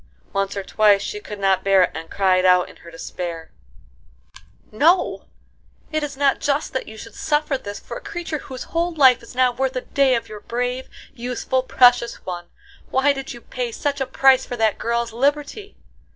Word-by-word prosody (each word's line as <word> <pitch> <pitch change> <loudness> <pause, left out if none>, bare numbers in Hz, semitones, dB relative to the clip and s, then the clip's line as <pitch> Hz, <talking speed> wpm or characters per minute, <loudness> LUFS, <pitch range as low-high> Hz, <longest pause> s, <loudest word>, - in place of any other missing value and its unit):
Once 195 0 -1
or 195 - -2
twice 205 0 +3
she 420 - -4
could 210 - -8
not 195 -1 +1
bear 195 -1 +5
it, - - 0
and 160 +1 -7
cried 185 -2 +2
out 180 -1 +5
in - - -15
her 170 - -13
despair: 165 0 -6 1.2
"No, 325 - +2 0.7
it 310 0 0
is 285 -2 -5
not 280 -1 +2
just 285 +2 -1
that 260 - -3
you 220 - -10
should - - -10
suffer 300 -1 0
this 205 -6 -6
for - - -8
a - - -10
creature 335 -6 -5
whose 260 -1 -8
whole 340 0 0
life 260 -4 +6
is 235 - -13
not 250 -1 +2
worth 265 -1 0
a 255 - -1
day 270 -1 +2
of 230 -1 -3
your 215 - -9
brave, 245 +3 -3 0.2
useful, 250 +1 -2
precious 245 -2 +4
one! 175 -1 -5 0.4
Why 270 +2 +3
did 270 -1 -6
you 240 - -9
pay 245 -1 -4
such 280 +3 -2
a 265 - 0
price 265 -1 +4
for 245 - -5
that 220 -2 +1
girl's 235 0 -1
liberty?" 290 - -1
250 Hz, 195 wpm, -22 LUFS, 205-280 Hz, 1.2 s, life